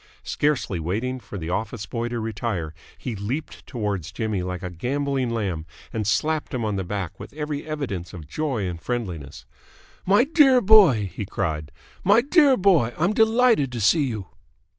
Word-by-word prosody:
Scarcely 140 - 0
waiting 110 +11 -2
for 105 - -9
the 80 -1 -4
office 110 +2 -3
boy 115 0 -3
to 120 -1 -3
retire, 110 -7 -3 0.2
he 120 - -5
leaped 120 +10 -5
towards 100 - -3
Jimmy 105 0 -2
like 90 0 -4
a 90 - -4
gambolling 135 +6 -1
lamb 95 -9 -2 0.3
and 110 -3 -2
slapped 155 +4 0
him 120 -3 -1
on 105 -1 -1
the 95 - -2
back 95 -2 -4
with - - -9
every 150 0 -4
evidence 135 - -4
of 80 -5 -9
joy 130 - -2
and 85 -2 -5
friendliness. 80 - -5 0.6
"My 200 +5 +5
dear 275 -3 +5
boy!" 185 - +6
he - - -5
cried. 75 -2 -3 0.3
"My 205 +5 +5
dear 285 -1 +5
boy! 170 -12 +3
I'm 175 +6 +2
delighted 225 - +3
to 120 - -3
see 140 +9 +4
you!" 110 -7 -4
115 Hz, 170 wpm, -24 LUFS, 95-155 Hz, 0.6 s, boy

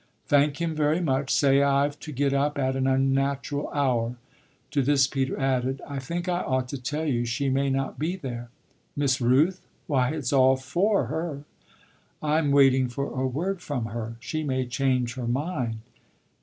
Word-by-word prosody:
"Thank 145 +1 +3
him 170 -1 -1
very 155 +2 +1
much; 140 -5 0
say 140 -1 +4
I've 140 +1 +2
to 155 - -8
get 140 0 0
up 145 +1 +1
at 130 -1 0
an 135 0 0
unnatural 135 +2 0
hour." 125 -4 0 0.6
To 140 - +2
this 135 0 +4
Peter 135 0 -2
added: 130 0 0
"I 140 -2 -4
think 170 +6 -4
I 175 -1 +1
ought 130 -4 -1
to 135 -1 -5
tell 150 +5 -2
you 120 -5 +1
she 120 +4 -1
may 135 +1 +1
not 135 0 -2
be 165 +5 -1
there." 120 -8 -6 0.5
"Miss 135 -3 +1
Rooth? 145 +10 +3 0.2
Why 130 -4 +1
it's 145 -4 -2
all 130 -1 +5
for 175 - +1
her." 155 +1 -4 0.8
"I'm 150 0 +1
waiting 135 -2 +5
for 140 +3 -4
a 130 - +1
word 175 +8 -2
from 140 -9 -3
her 115 0 -4
she 155 +6 -3
may 130 -3 -1
change 125 -1 0
her 125 -2 -4
mind." 125 -4 -2
135 Hz, 175 wpm, -26 LUFS, 130-150 Hz, 0.8 s, all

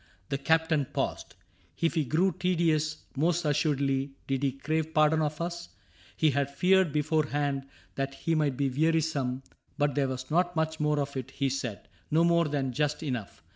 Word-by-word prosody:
The 140 -1 -1
Captain 160 -1 +2
paused: - - -3 0.4
If 165 - +1
he 160 -4 +1
grew 170 +8 +2
tedious, 165 -4 0
most 165 +4 +1
assuredly 140 -2 +1
Did 135 -1 -1
he 135 -2 +1
crave 155 +3 -2
pardon 155 +1 +4
of 150 0 -1
us; 170 0 -4 0.5
he 155 -2 +4
had 140 +1 0
feared 180 +4 +3
Beforehand 145 -2 0 0.3
that 135 0 -3
he 165 +4 -1
might 150 -5 +1
be 140 - +1
wearisome, 145 -2 0 0.3
But 145 -2 +2
there 140 0 +1
was 130 +1 -5
not 175 +2 +2
much 160 0 -1
more 150 -1 +1
of 140 0 -3
it, 130 -1 -4
he 135 0 -1
said, 125 -6 -4
— - - -36
No 160 +2 +3
more 170 0 +4
than 140 -4 -1
just 150 +3 -1
enough. 120 - -4
150 Hz, 175 wpm, -29 LUFS, 135-160 Hz, 0.5 s, pardon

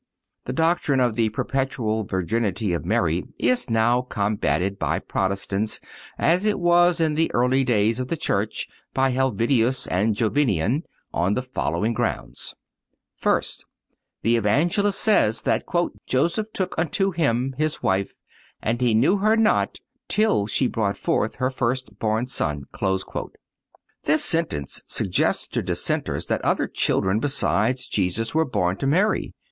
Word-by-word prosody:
The 125 - -3
doctrine 160 -3 +1
of 120 -3 +2
the 115 -1 +2
perpetual 115 -2 -2
virginity 95 +1 -1
of 85 - -2
Mary 90 -4 +1 0.2
is 125 +1 +1
now 115 +2 +3
combated 100 -4 -1
by - - 0
Protestants, 100 +2 -2 0.4
as 180 +4 +2
it 210 -1 +1
was 175 0 +4
in 160 -2 +2
the 160 +2 +1
early 125 +2 +3
days 115 -1 +1
of 130 - -3
the 165 - -2
Church 105 -8 -2 0.3
by 135 0 +2
Helvidius 125 0 +1
and 105 +4 +1
Jovinian, 115 - +1 0.3
on 95 +5 +1
the 125 - -1
following 110 - -1
grounds: - - -3 0.6
First—The 115 +2 -2
Evangelist 175 - +1
says 115 - +2
that - - 0 0.4
"Joseph 170 - 0
took 185 -3 -2
unto 195 +4 +1
him 135 -6 0
his 155 0 -1
wife, 95 +1 0 0.4
and 120 +3 -2
he 120 -3 +3
knew 140 - +4
her 215 +3 +3
not 225 -1 +2 0.3
till 115 - +2
she 130 - +1
brought 105 -5 -1
forth 110 - 0
her 130 0 -1
first 130 0 -2
born 110 +2 0
son."(223) 95 - -2 0.8
This 155 +2 +3
sentence 155 - 0
suggests - - +1
to - - -1
dissenters - - -2
that - - -1
other - - +1
children 95 +3 +1
besides 130 -2 +1
Jesus 100 +3 -1
were 160 +1 +2
born 90 - 0
to 135 - -2
Mary. 190 +9 +1
120 Hz, 140 wpm, -23 LUFS, 105-150 Hz, 0.8 s, was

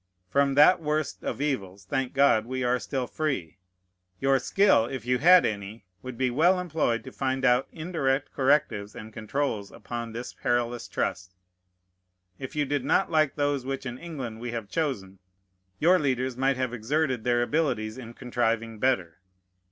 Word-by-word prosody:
From 140 -1 +2
that 150 +5 +6
worst 150 -1 -2
of - - -3
evils, 100 -10 -3
thank 135 -3 -2
God, 135 -5 +4
we 130 0 -3
are 125 +1 +2
still 130 0 -3
free. 120 - -3 0.6
Your 135 0 +3
skill, 195 - +3
if 125 -1 -6
you 125 0 +1
had 180 +5 +7
any, 100 0 -4 0.2
would 130 -2 -8
be 130 -1 +1
well 175 +8 +3
employed 155 -10 -1
to 130 - -9
find 130 0 -1
out 125 +1 +3
indirect 150 -5 -1
correctives 130 -7 +1
and 110 0 -9
controls 110 -2 -2
upon 120 -1 -6
this 120 +2 -6
perilous 120 -1 -1
trust. 90 0 -3 1.0
If 130 +1 -7
you 150 -1 +1
did 145 -1 -1
not 170 +6 +2
like 155 -3 +2
those 145 -2 0
which 135 +1 -4
in 125 0 -5
England 135 -10 -6
we 120 +1 -5
have 115 -4 -5
chosen, 100 - -2 0.6
your 180 - +4
leaders 130 -3 -1
might 135 +1 +1
have 130 -1 -2
exerted 130 +1 -1
their 120 0 +2
abilities 120 -6 -1
in 115 -2 -10
contriving 115 -3 -1
better. 90 -11 0
130 Hz, 165 wpm, -27 LUFS, 115-145 Hz, 1.0 s, had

